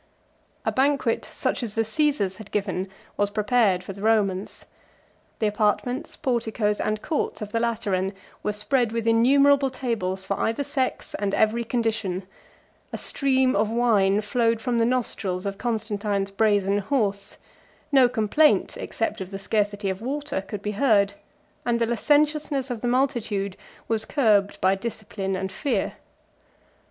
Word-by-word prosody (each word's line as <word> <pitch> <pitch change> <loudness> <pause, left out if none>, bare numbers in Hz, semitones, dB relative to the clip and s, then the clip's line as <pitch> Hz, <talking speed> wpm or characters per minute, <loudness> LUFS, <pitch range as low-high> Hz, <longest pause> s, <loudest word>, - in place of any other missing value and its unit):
A - - +2
banquet, 265 -3 +1
such - - -2
as 225 -4 -5
the 225 - +2
Cæsars 225 -6 0
had 210 -2 -11
given, 190 -2 -2 0.3
was 205 0 +2
prepared 210 -3 +2
for 195 - -7
the 195 - -11
Romans. 205 -3 0 0.7
The 220 - 0
apartments, 210 +4 0
porticos, 220 -4 0
and 215 0 -1
courts 315 - -2
of 210 -2 -6
the 230 - 0
Lateran 205 -5 -1 0.3
were 210 - -1
spread 225 +3 0
with 230 -1 -2
innumerable 270 +4 +5
tables 215 -8 -3
for 195 - -2
either 225 +5 0
sex, 275 -2 -2
and 200 -1 0
every 220 +2 +2
condition; 220 -6 -1 0.7
a - - -4
stream 265 -2 +1
of 215 - +2
wine 215 -4 +3
flowed 230 +1 +1
from 240 0 0
the 230 - +3
nostrils 210 -6 -1
of 200 -1 -4
Constantine's 210 -4 -1
brazen 200 -1 +2
horse; 200 -3 -1 0.5
no 265 -3 +6
complaint, 250 +6 +2
except 225 -2 -3
of 185 - -5
the 195 - -5
scarcity 205 0 -1
of 190 +2 -6
water, 280 -3 -2
could 200 +1 -7
be 210 - -1
heard; 205 -3 +3 0.5
and 235 -1 +1
the 230 - +2
licentiousness 290 +2 +1
of 235 -3 -4
the 245 - -1
multitude 235 -7 0 0.3
was 220 -1 -1
curbed 210 -8 +2
by 190 +1 +4
discipline 200 -2 -4
and 190 0 -3
fear. 280 +8 -1
220 Hz, 150 wpm, -25 LUFS, 200-245 Hz, 0.7 s, no